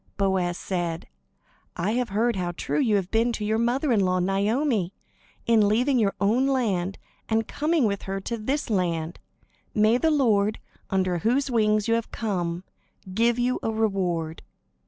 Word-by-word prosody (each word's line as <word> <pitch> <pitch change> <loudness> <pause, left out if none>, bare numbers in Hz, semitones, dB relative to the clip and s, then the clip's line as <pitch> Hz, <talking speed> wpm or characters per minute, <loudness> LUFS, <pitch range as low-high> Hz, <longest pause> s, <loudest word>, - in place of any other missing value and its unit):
Boaz 190 -3 0
said: 175 -3 -3 0.7
"I 185 +5 -1
have 245 +1 -1
heard 230 +4 +1
how 175 -2 -2
true - - -2
you 230 -7 +2
have 190 -3 -1
been 230 +2 +2
to 215 - -3
your 220 +1 +1
mother 250 +5 +1
in 225 - +3
law 185 -1 +2
Naomi, 200 - 0 0.5
in 220 -3 +4
leaving 250 +5 +2
your 200 -3 +1
own 230 +7 +2
land 200 -9 0 0.3
and 225 0 +1
coming 305 -2 +1
with 200 -2 -1
her 195 0 -2
to 235 - -3
this 250 +4 -2
land. 170 -4 -1 0.6
May 215 +3 +4
the 320 - +2
Lord, 220 -8 +2 0.3
under 185 -2 0
whose 255 - +1
wings 215 -2 +2
you 230 - +2
have 230 0 -1
come, 180 -5 -2 0.5
give 230 +3 +2
you 245 +1 0
a - - -1
reward!" 185 -7 -1
215 Hz, 165 wpm, -25 LUFS, 190-235 Hz, 0.7 s, in